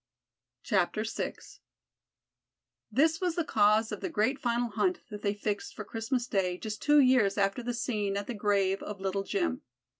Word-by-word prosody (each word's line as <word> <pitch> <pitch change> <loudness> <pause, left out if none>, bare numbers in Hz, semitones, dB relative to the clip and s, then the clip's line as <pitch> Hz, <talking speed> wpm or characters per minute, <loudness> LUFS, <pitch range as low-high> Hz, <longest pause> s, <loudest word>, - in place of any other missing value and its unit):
VI 190 -6 +3 2.0
This 320 +4 +3
was 355 -3 0
the 340 - +1
cause 215 -4 +3
of - - -5
the 375 - -2
great 245 +1 +1
final 240 0 0
hunt 365 - 0
that 210 -1 -6
they 205 0 0
fixed 205 0 -3
for 215 - -6
Christmas 230 +4 -2
Day 190 -7 0
just 215 +1 -6
two 295 0 +5
years 255 -7 +4
after 195 +4 +1
the 240 0 -3
scene 210 -5 -1
at 200 - -3
the 245 - -4
grave 200 -2 +1
of 210 -2 -6
Little 195 +1 -1
Jim. 330 - -1
220 Hz, 170 wpm, -30 LUFS, 200-255 Hz, 2.0 s, two